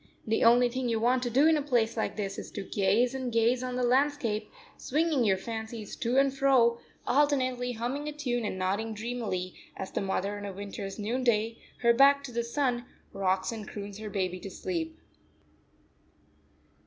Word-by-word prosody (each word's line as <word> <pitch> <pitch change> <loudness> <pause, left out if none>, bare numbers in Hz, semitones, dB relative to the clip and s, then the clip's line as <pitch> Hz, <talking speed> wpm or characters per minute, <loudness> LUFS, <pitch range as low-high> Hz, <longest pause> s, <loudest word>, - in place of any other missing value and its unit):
The 225 0 +1
only 240 +2 +6
thing 250 0 -2
you 225 -1 +1
want 245 +3 +2
to 245 - -1
do 265 +5 +4
in 320 -1 +5
a - - 0
place 240 -5 +1
like 220 - -2
this 200 -2 -3
is - - -7
to 200 - -4
gaze 205 +6 +2
and 260 -2 -3
gaze 230 +2 +2
on 255 -1 -3
the 250 - 0
landscape, 245 -4 +1 0.2
swinging 305 -2 +1
your 195 -4 +3
fancies 220 +1 -6
to 245 +2 0
and 275 0 +4
fro, 255 -4 +4 0.3
alternately 255 -3 +1
humming 250 +6 -3
a - - -2
tune 250 -5 -2
and 210 - -3
nodding 200 +4 -1
dreamily, 210 -5 -3 0.2
as 190 - -5
the - - -2
mother 200 +1 -2
on 205 - -6
a 200 - -5
winter's 195 0 -6
noonday, 230 0 0 0.2
her 235 0 +6
back 280 +3 +5
to 275 - -7
the 235 0 -1
sun, 245 0 -1 0.3
rocks 190 0 0
and 220 -3 -6
croons 200 0 -7
her 215 -1 -5
baby 185 -2 -2
to 195 - -7
sleep. 165 -3 -4
235 Hz, 185 wpm, -29 LUFS, 205-255 Hz, 0.3 s, only